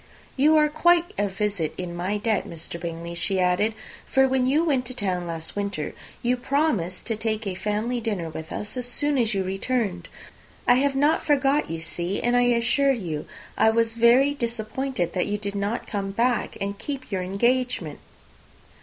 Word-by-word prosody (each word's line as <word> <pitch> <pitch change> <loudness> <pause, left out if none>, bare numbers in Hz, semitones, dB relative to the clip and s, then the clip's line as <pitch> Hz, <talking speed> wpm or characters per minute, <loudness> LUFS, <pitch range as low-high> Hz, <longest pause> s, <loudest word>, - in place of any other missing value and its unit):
"You 300 +3 +5
are 300 0 +5
quite 345 +3 +3
a 205 - +2
visit 200 -5 -2
in 175 -1 -5
my 185 +4 -1
debt, 215 -1 0
Mr. 170 +1 -7
Bingley," 170 0 -5
she 190 +2 0
added; 185 +5 +2 0.3
"for 265 0 +4
when 260 -1 +1
you 295 +5 +3
went 275 -6 +2
to 255 - -4
town 185 -6 -1
last 165 -1 -5
winter, 200 -6 -3 0.3
you 245 +1 +2
promised 245 - 0
to 225 - 0
take 215 0 -2
a 195 - -2
family 210 +6 -1
dinner 205 -7 -2
with 160 0 -7
us 210 +3 -5
as 250 -1 -2
soon 290 +4 0
as 225 -3 +1
you 195 - +1
returned. 195 -2 -2 0.6
I - - +7
have 280 -1 +1
not 295 +4 +3
forgot, 285 0 +2
you 165 0 -4
see; 175 +4 -2
and 240 +1 +1
I 245 0 +4
assure 245 +4 +3
you 170 - -4 0.3
I 220 - +4
was 225 0 +2
very 235 +4 +5
much 285 - -8
disappointed 235 -4 -2
that 180 - 0
you 205 0 -1
did 200 -1 -4
not 205 +3 -2
come 200 -2 -3
back 235 +5 0
and 200 0 -3
keep 270 -5 -5
your 190 -2 -1
engagement." 200 - 0
220 Hz, 190 wpm, -25 LUFS, 185-255 Hz, 0.6 s, I